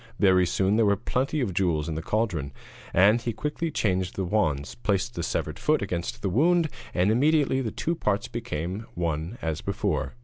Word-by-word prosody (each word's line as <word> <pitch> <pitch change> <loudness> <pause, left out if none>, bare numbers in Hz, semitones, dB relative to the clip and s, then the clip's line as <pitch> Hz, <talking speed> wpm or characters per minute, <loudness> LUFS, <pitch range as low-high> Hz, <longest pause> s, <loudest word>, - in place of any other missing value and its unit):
Very 95 -3 +4
soon 95 +4 +1
there 115 - +4
were 100 - +4
plenty 130 +8 -1
of 105 -7 -1
jewels 85 -5 +1
in 80 - -2
the 80 - -3
cauldron, 90 -7 -1 0.4
and 105 +6 +5
he 120 - -2
quickly 150 +7 -2
changed 95 - 0
the 95 - -1
wands, 80 -8 0
placed 115 +1 -1
the 85 - -4
severed - - -2
foot - - +2
against 85 -1 -4
the 100 - +1
wound, 165 - +3 0.2
and 95 +3 +2
immediately 140 +2 +3
the 120 - -2
two 165 - -2
parts 110 -7 -1
became 100 -2 -4
one 85 +4 -2
as 80 -2 -2
before. 65 -2 -2
100 Hz, 190 wpm, -26 LUFS, 85-120 Hz, 0.4 s, and